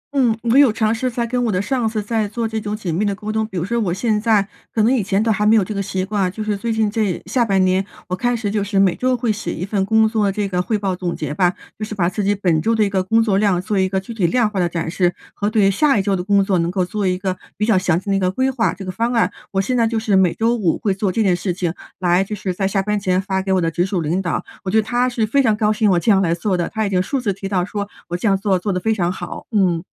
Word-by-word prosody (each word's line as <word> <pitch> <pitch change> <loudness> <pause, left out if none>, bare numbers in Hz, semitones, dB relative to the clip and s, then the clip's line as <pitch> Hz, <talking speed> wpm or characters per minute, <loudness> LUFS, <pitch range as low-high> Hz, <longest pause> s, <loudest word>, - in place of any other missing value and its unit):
嗯， 240 -5 +3
我 235 +1 +2
有 280 -5 +6
尝 220 0 +1
试 255 +3 -1
在 235 -1 -2
跟 245 +1 -1
我 225 - +1
的 185 - 0
上 235 +2 0
司 220 -1 -3
在 220 0 -1
做 230 +2 -3
这 220 -1 -3
种 210 +1 -3
紧 180 -6 -3
密 180 +6 0
地 200 -1 0
沟 210 +2 -5
通。 220 0 -1
比 190 - -7
如 170 - -1
说 235 +4 -1
我 200 -6 0
现 210 +3 0
在 215 -3 +2 0.2
可 220 - +1
能 235 +4 +4
以 255 - +2
前 200 +1 0
都 225 - +2
还 210 -1 0
没 215 +2 +5
有 215 - +4
这 215 - -5
个 200 - -2
习 190 -1 -2
惯， 195 -2 0
就 215 +3 -5
是 210 -1 -1
最 225 +4 -3
近 220 -2 +1
这 210 -5 -1
下 250 - +1
半 195 -4 +2
年 185 +1 +2 0.3
我 185 - 0
开 245 +5 0
始 220 -3 -2
就 210 -1 0
是 200 0 -2
每 195 -2 +4
周 255 0 0
会 235 -1 0
写 215 +1 -4
一 180 - -4
份 200 -1 0
工 220 +1 +4
作 215 -3 +1
这 205 0 -2
个 180 -2 -1
汇 215 +4 -1
报 195 -2 -2
总 180 -1 -3
结 150 -1 -4
吧， 175 +2 +2 0.3
就 - - -4
是 215 0 -5
把 175 -4 +1
自 185 +3 -2
己 205 +1 +2
本 175 -6 +1
周 230 +6 +1
的 220 - +3
一 205 - +1
个 190 -1 +1
工 225 +5 +2
作 200 -3 +1
量 200 -4 +2
做 200 +2 -1
一 190 0 +2
个 190 0 0
具 195 +5 -8
体 200 -6 +1
量 235 +5 +2
化 210 -2 -3
的 175 -1 +1
展 165 -1 -3
示， 180 -1 +1 0.2
和 205 +1 -1
对 205 -3 +3
下 275 +5 +3
一 195 - +1
周 200 0 +1
的 180 - -3
工 200 0 +3
作 190 -2 +1
能 170 0 0
够 185 0 0
做 205 +1 -2
一 180 0 +1
个 185 -1 -2 0.2
比 210 - 0
较 220 -2 +3
详 180 -2 +2
细 200 +1 -4
的 - - +2
一 - - +1
个 185 -1 +1
规 260 +8 0
划、 245 -3 +1
这 195 - -8
个 185 - -3
方 230 +5 -1
案。 230 - +2 0.2
我 195 - +1
现 250 +6 -1
在 230 -2 +3
就 230 - -2
是 220 -2 +1
每 185 -3 +3
周 230 +2 +1
五 190 -8 +1
会 200 - 0
做 195 0 -1
这 225 - +1
件 185 -3 +3
事 180 +1 -2
情 175 -2 -2 0.2
来 180 0 +2
就 210 +2 -5
是 190 -2 -3
在 195 +1 -1
下 195 0 0
班 210 0 0
前 185 -1 +1
发 190 0 -1
给 190 0 -3
我 190 - +3
的 165 -2 0
直 175 +2 0
属 185 -1 -1
领 165 +4 -1
导。 175 - -2 0.2
我 190 - -3
觉 215 - +2
得 - - +1
他 245 +3 +1
是 235 -3 0
非 275 +6 +2
常 220 -5 +2
高 215 -1 +2
兴 215 -1 +2
我 180 -2 +3
这 220 - +2
样 195 - +4
来 170 -3 +1
做 185 +2 -1
的， 175 -1 -1
他 220 0 -1
已 - - -1
经 180 -1 +2
数 265 +9 -2
次 215 -6 -1
提 195 +1 -6
到 180 -3 0
说 205 +1 -4 0.2
我 175 - -2
这 180 +6 -1
样 195 -1 +3
做 195 -2 +1
做 200 +3 -2
得 180 - -1
非 220 +5 +1
常 180 -4 0
好。 175 -2 -7
嗯。 180 -6 +2
200 Hz, 355 characters per minute, -19 LUFS, 185-220 Hz, 0.3 s, 有